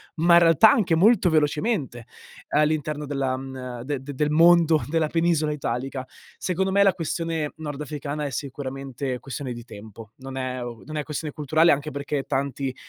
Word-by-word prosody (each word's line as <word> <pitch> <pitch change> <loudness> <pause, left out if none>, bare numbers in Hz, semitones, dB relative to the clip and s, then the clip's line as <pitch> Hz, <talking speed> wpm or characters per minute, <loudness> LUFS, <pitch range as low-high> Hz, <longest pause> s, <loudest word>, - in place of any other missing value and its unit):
ma 170 +2 +3
in 170 - +9
realtà 170 +5 +6
anche 185 -7 +2
molto 195 +2 +4
velocemente, 150 - 0 0.4
all'interno 150 0 0
della 135 -2 -1
mhmm, 130 -2 -7
de 140 0 -3
de 140 +2 -7
del 150 +2 0
mondo 165 -1 +5
della 160 0 +1
penisola 165 -1 +1
italica. 130 -1 -3 0.4
Secondo 190 +1 -1
me, 200 +1 +3
la 195 -1 +5
questione 165 -3 -3
nordafricana 150 -1 -5
è 140 - -4
sicuramente 135 -1 -5
questione 135 -1 -6
di 120 0 -9
tempo. 110 -1 -12
Non 135 0 -9
è 130 -1 -3
non 120 +6 -8
è 150 - -1
questione 150 +1 -5
culturale 155 +3 +3
anche 145 +2 -1
perché 140 0 -3
tanti 135 -1 -2
145 Hz, 165 wpm, -24 LUFS, 130-160 Hz, 0.4 s, in